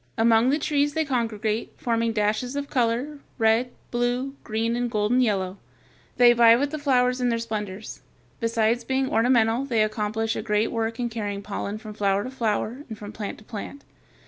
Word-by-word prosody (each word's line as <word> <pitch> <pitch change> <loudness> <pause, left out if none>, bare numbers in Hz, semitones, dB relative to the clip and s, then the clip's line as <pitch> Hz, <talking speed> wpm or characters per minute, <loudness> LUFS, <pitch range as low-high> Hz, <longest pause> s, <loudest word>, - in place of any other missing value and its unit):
Among 225 +2 +4
the 285 - +3
trees 290 -1 0
they 320 0 +1
congregate, 225 -4 -1
forming 230 -1 0
dashes 215 +4 0
of 285 0 -4
color, 250 +4 0 0.2
red, 225 +1 +3 0.2
blue, 245 +3 -1
green, 225 +1 -1
and 245 0 -1
golden 220 +3 +2
yellow. 195 -5 0 0.6
They 240 -1 +7
vie 230 -1 +7
with 285 +4 0
the 310 - -4
flowers 250 -3 +2
in 245 - +2
their 230 - +1
splendors; 210 -3 -5 0.4
besides 230 0 +1
being 265 +2 0
ornamental 230 0 +3
they 235 -6 +2
accomplish 215 +1 -1
a - - -2
great 210 0 0
work 225 0 -2
in 240 -1 -1
carrying 205 -3 -4
pollen 205 0 -4
from 215 -1 -9
flower 200 -1 +1
to 255 - -6
flower 235 +1 -2
and 220 - -6
from 205 0 -8
plant 210 -1 -6
to - - -16
plant. 225 +6 -8
230 Hz, 180 wpm, -25 LUFS, 215-250 Hz, 0.6 s, They